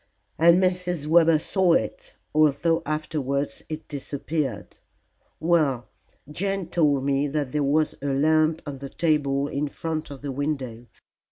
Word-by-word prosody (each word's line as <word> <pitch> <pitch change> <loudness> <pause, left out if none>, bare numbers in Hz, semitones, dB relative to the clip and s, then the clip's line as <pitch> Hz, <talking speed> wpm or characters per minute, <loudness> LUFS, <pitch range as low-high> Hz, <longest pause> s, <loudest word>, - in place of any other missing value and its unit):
"And 170 +2 +6
Mrs. 180 -4 0
Webber 165 0 +5
saw 180 +2 +2
it, 110 -9 -2 0.2
although 155 +2 +3
afterwards 145 -2 -2
it 155 0 -6
disappeared. 145 -4 -4 0.6
Well, 155 -7 +1 0.4
Jane 190 +3 -2
told 145 -6 +2
me 140 +1 +1
that 145 -2 -2
there 150 - 0
was 150 +2 +2
a 145 - -3
lamp 155 +3 +2
on 140 -2 -6
the 140 0 -7
table 145 -4 +1
in 145 0 -2
front 160 +1 -4
of 140 -1 -10
the 140 - -3
window. 130 -4 -4
150 Hz, 140 wpm, -25 LUFS, 140-165 Hz, 0.6 s, And